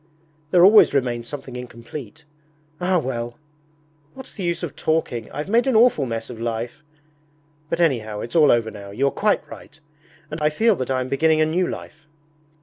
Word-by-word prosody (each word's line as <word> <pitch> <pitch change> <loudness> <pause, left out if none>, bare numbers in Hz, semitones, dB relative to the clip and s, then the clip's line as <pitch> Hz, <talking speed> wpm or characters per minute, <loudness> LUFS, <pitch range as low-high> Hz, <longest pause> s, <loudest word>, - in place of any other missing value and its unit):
There 175 0 +6
always 210 -6 +7
remains 120 -3 -1
something 135 -2 -8
incomplete. 125 +4 -9 0.5
Ah 180 +1 +1
well! 120 -4 -3 0.8
What's 265 - -10
the - - -9
use 175 -1 -2
of 155 -4 -5
talking? 150 -9 -1
I've 150 +4 -5
made 235 +6 +2
an 260 - +2
awful 220 - +4
mess 115 -1 -4
of 115 -2 -9
life! 115 +5 -4 0.9
But 170 - -2
anyhow 115 -10 0
it's 120 - -7
all 155 -3 +6
over 115 -2 +1
now; 100 -1 -10
you 115 +8 -1
are 140 - +2
quite 210 0 0
right. 150 - -13 0.5
And 155 +1 -5
I 150 - +3
feel 220 +8 +2
that 130 - -4
I 130 -1 0
am 130 - -3
beginning 155 +4 +2
a - - +5
new 175 +3 0
life.' 155 0 -8
145 Hz, 185 wpm, -22 LUFS, 120-170 Hz, 0.9 s, always